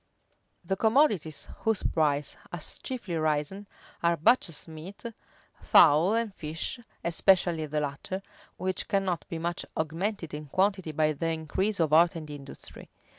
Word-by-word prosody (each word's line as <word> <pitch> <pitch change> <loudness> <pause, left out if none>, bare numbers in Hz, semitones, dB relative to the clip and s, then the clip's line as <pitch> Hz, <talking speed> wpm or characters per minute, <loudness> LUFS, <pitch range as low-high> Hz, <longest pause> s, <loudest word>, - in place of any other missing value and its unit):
The 195 - 0
commodities 215 - +2
whose 220 -3 0
price 145 -3 +1 0.2
has 175 -3 -4
chiefly 220 -10 -4
risen, 155 +6 -1 0.3
are 170 0 +2
butcher's 170 - +2
meat, 160 +5 -10 0.6
fowl, 165 +6 +6
and 230 -3 -1
fish, 160 +8 -3 0.2
(especially 170 -2 +3
the 150 +1 -1
latter,) 150 +7 -4 0.3
which 185 +1 -2
cannot 190 -4 0
be 165 - -3
much 170 +1 -2
augmented 165 +2 -2
in 150 0 -6
quantity 190 +1 +1
by 155 0 +2
the 165 +3 -2
increase 180 +6 -1
of 155 -2 +2
art 170 +2 +6
and 155 -2 -7
industry. 140 -2 -9
170 Hz, 135 wpm, -28 LUFS, 155-195 Hz, 0.6 s, fowl